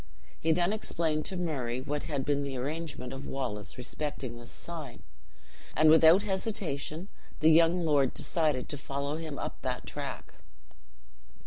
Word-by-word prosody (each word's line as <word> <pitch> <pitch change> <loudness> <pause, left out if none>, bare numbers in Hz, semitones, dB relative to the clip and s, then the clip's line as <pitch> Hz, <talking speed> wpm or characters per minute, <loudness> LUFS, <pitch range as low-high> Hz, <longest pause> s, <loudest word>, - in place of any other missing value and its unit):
He 160 - +2
then 175 +4 +3
explained 160 -7 0
to 190 - -2
Murray 135 -9 -1
what 145 +3 -3
had 140 -3 -2
been 145 -1 +1
the 140 -2 -3
arrangement 145 -1 -4
of 135 +1 -6
Wallace 120 -7 -4
respecting 130 -1 -3
this 120 0 -10
sign, 155 -8 -7 0.7
and 155 0 +6
without 160 +4 +7
hesitation 190 -5 -2 0.3
the 155 +1 +6
young 165 +2 +5
lord 145 -4 +3
decided 150 -6 0
to 145 - -3
follow 140 +2 -3
him 155 -3 -5
up - - -5
that - - -3
track. - - -5
150 Hz, 145 wpm, -30 LUFS, 135-165 Hz, 0.7 s, without